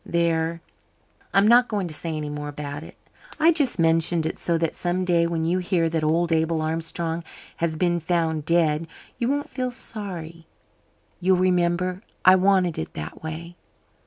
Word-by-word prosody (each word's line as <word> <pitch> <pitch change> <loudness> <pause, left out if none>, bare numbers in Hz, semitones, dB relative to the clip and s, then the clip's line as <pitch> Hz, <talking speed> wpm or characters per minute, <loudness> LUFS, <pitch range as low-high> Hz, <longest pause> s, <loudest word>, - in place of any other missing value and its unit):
There, 165 -1 0 0.7
I'm 200 +1 +4
not 245 +2 +6
going 205 -4 -2
to 160 - -5
say 160 +1 -2
any 150 -1 -4
more 145 0 -5
about 145 0 -6
it. 160 - -12 0.4
I 325 +2 +6
just 285 - 0
mentioned 165 0 +2
it 160 - -3
so 170 -1 0
that 165 -1 -1
some 180 +1 -1
day 170 -2 +3
when 165 -1 -1
you 175 +3 +1
hear 175 -2 +1
that 160 -1 -1
old 165 +2 +1
Abel 160 0 +2
Armstrong 165 +1 -2 0.3
has 165 -1 -1
been 175 0 +1
found 160 -2 0
dead, 165 -1 +2 0.3
you 235 - 0
won't 285 +1 -1
feel 255 -1 -2
sorry. 180 -9 -7 0.7
You'll 185 +1 +3
remember 180 0 +1 0.2
I 185 - +9
wanted 185 -2 +2
it 80 0 -6
that 75 -1 -7
way. 165 +2 -7
170 Hz, 170 wpm, -24 LUFS, 160-185 Hz, 0.7 s, I